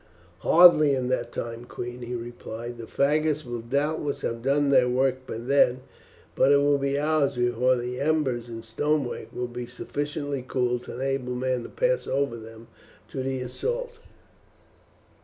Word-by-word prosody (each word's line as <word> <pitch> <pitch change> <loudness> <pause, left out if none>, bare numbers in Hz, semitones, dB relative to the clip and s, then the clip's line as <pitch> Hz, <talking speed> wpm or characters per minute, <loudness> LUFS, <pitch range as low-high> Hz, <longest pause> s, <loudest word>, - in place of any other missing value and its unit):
"Hardly 155 - +7
in 125 -1 -1
that 120 -2 -1
time, 115 +1 -5
queen," 120 0 -7
he 120 0 -4
replied. 120 0 -7
"The 115 - -7
faggots 150 +1 +1
will 120 -1 -4
doubtless 145 +4 -1
have 115 0 -3
done 140 +2 +2
their 125 -2 +5
work 130 +1 0
by - - -4
then, 125 +1 +3 0.5
but 135 - +4
it 140 - +7
will 145 0 +3
be 140 0 0
hours 145 -2 +1
before 120 +1 +2
the 125 +1 -4
embers 140 -6 0
and 115 -1 -8
stonework 140 +4 -1
will 125 - -3
be 120 0 -6
sufficiently 145 +2 -4
cool 125 -2 0
to 120 - -9
enable 130 -1 -2
men 130 0 -1
to - - -8
pass - - 0
over 140 -2 0
them 115 0 -12 0.4
to 135 - -3
the 130 0 -2
assault." 480 - -4
130 Hz, 160 wpm, -26 LUFS, 120-145 Hz, 0.5 s, Hardly